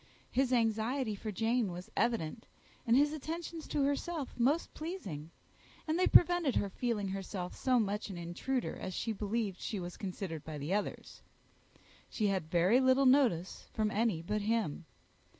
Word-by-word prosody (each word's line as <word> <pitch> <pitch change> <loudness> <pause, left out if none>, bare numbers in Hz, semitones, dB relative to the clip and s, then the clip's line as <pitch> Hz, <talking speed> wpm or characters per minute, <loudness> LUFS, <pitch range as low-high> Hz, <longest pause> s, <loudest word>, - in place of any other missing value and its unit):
His 260 0 +2
anxiety 230 +1 +1
for 215 +2 -5
Jane 225 0 +1
was 175 +1 -8
evident, 225 -3 0 0.4
and 230 +2 +5
his 290 +2 +4
attentions 320 +1 -5
to 290 - 0
herself 285 +1 -1
most 275 +8 +1
pleasing; 195 - -6 0.6
and 315 +3 +1
they 370 - +4
prevented 350 -6 +5
her 200 -1 0
feeling 215 -3 -1
herself 190 -1 -4
so 255 -2 +2
much 210 0 -1
an 190 - -6
intruder 175 +10 -2
as 185 - -5
she 225 - -1
believed 205 -2 -2
she 210 - -3
was 175 -1 -6
considered 185 -5 -5
by 155 -1 -6
the 145 +6 -2
others. 205 0 -3 0.9
She 215 - -1
had 185 -5 -1
very 180 +8 +4
little 260 +1 +4
notice 250 - +3
from 215 -1 0
any 210 -7 +1
but 210 +5 -1
him. 205 -7 -1
220 Hz, 160 wpm, -33 LUFS, 190-260 Hz, 0.9 s, and